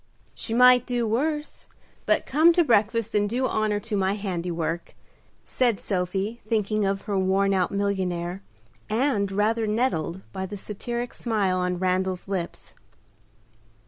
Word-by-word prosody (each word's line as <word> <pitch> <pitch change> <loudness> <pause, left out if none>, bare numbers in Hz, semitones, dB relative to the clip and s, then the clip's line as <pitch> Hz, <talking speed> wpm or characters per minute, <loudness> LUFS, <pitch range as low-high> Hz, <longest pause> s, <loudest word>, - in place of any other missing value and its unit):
"She 225 - -4
might 250 0 +6
do 240 -2 0
worse; 295 +7 -2 0.4
but - - +2
come 315 +5 +5
to 345 - +4
breakfast 225 -3 +2
and 205 -1 +2
do 255 +4 0
honor 215 -3 0
to 220 -1 -3
my 195 0 +1
handiwork," 175 -4 -3 0.5
said 240 -5 +1
Sophie, 195 +4 -2
thinking 215 -1 +1
of 195 0 -1
her 200 -3 -1
worn 195 +1 +2
out 185 -2 +1
millionnaire, 190 -3 -2 0.5
and 215 -4 +1
rather 220 +3 +1
nettled 190 -6 -1
by 190 -1 -4
the 205 - -7
satiric 235 +5 -5
smile 205 -6 0
on 180 0 -1
Randal's 185 0 -1
lips. 185 -3 -4
205 Hz, 140 wpm, -25 LUFS, 190-230 Hz, 0.5 s, might